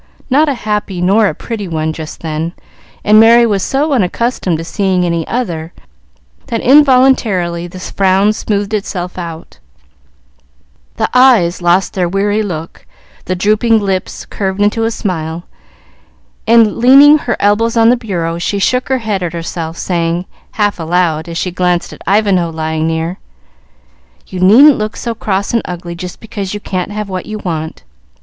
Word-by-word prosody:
Not 295 +3 +3
a 280 - -1
happy 210 -4 -3
nor 200 +5 +3
a - - -3
pretty 220 -4 -6
one 160 -1 -2
just 155 -1 -8
then, 160 +1 -3 0.5
and 215 +1 +5
Merry 235 +2 +6
was 205 -4 0
so 285 +7 0
unaccustomed 215 -4 0
to 165 - -5
seeing 185 0 0
any 170 -2 -2
other, 170 -9 -4 0.7
that 230 - -2
involuntarily 250 - +3
the 185 +1 -10
frown 195 +2 +1
smoothed 205 -1 -2
itself 185 -3 -4
out, 165 -2 -8 1.4
the - - +1
eyes 235 -10 +4
lost 175 +2 +2
their 180 -2 -1
weary 205 +3 0
look, 165 -6 -6 0.4
the 185 - -2
drooping 215 +4 +2
lips 195 -2 -3
curved 190 -1 -4
into 210 +2 +1
a - - +1
smile, 170 -6 -4 1.0
and, 225 -2 +4
leaning 280 +5 +7
her 240 -5 -3
elbows 225 +3 +1
on 225 0 +5
the 245 - +5
bureau, 175 -8 -3
she 200 +3 -2
shook 250 +7 0
her 265 - +2
head 215 -5 -3
at 175 -2 -3
herself, 165 -1 -5
saying, 170 0 -1 0.3
half 205 -3 0
aloud, 165 -1 0
as 165 - -5
she 180 - -2
glanced 180 -1 -1
at - - -14
Ivanhoe 195 -4 +2
lying 160 0 -2
near, 165 +3 -3 1.1
"You 185 - -7
needn't 235 +10 +6
look 215 +1 -3
so 235 - -3
cross 200 -2 -2
and 230 - +2
ugly 175 -1 -6
just 180 +1 -8
because 205 -3 -6
you - - -4
can't 185 -2 -4
have 210 0 -5
what 185 -1 -5
you 215 0 -5
want. 160 -5 -5
195 Hz, 160 wpm, -14 LUFS, 170-220 Hz, 1.4 s, leaning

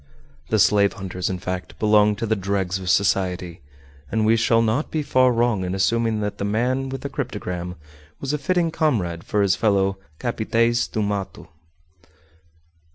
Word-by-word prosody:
The - - +2
slave 100 -1 +4
hunters 95 -3 -4
in 95 - -2
fact 90 0 -5
belonged 105 -1 +3
to 115 - -2
the 110 0 +1
dregs 95 -1 -1
of 90 -1 -5
society, 90 -3 0 0.5
and 110 -1 +1
we 110 +1 +4
shall 115 0 +3
not 115 +7 0
be 155 -1 -2
far 130 -2 +3
wrong 115 -4 +1
in 90 +1 -2
assuming 115 +2 +1
that 105 0 -3
the - - -2
man 125 +6 0
with 135 0 -5
the - - -3
cryptogram 90 -10 -4 0.4
was 140 +1 -3
a 150 - -1
fitting 170 +2 +1
comrade 105 - 0
for 105 -1 0
his 95 -2 +3
fellow 95 -2 +1 0.2
_"capitaes 115 0 +1
do 110 - -2
mato." 100 -5 -4
105 Hz, 165 wpm, -22 LUFS, 95-120 Hz, 0.5 s, slave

